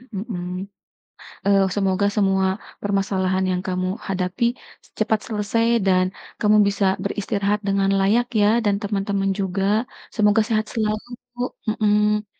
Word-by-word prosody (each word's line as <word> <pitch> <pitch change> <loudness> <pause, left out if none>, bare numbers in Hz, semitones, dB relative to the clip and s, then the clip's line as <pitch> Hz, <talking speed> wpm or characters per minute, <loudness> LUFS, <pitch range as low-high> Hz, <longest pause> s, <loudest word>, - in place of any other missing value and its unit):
Mmm, 190 -3 -4 1.0
eee, 200 -1 +5 0.2
semoga 195 0 +1
semua, 195 -2 +2 0.4
permasalahan 190 -2 0
yang 180 0 -1
kamu 185 0 -1 0.2
hadapi, 185 +3 -1 0.5
cepat 215 0 +1
selesai 215 +1 0 0.2
dan, 185 -1 +4 0.3
kamu 210 0 +4
bisa 200 0 0 0.2
beristirahat 205 0 -1
dengan 195 0 +2
layak 220 +5 +3
ya, 205 - +5 0.2
dan 205 -1 +3
teman-teman 200 -1 -1
juga, 195 0 -1 0.5
semoga 210 0 +4
sehat 215 -1 +1
selalu, 215 -1 -1 0.3
bu 245 - -10 0.3
mhm. 210 0 +2
200 Hz, 120 wpm, -22 LUFS, 195-210 Hz, 1.0 s, eee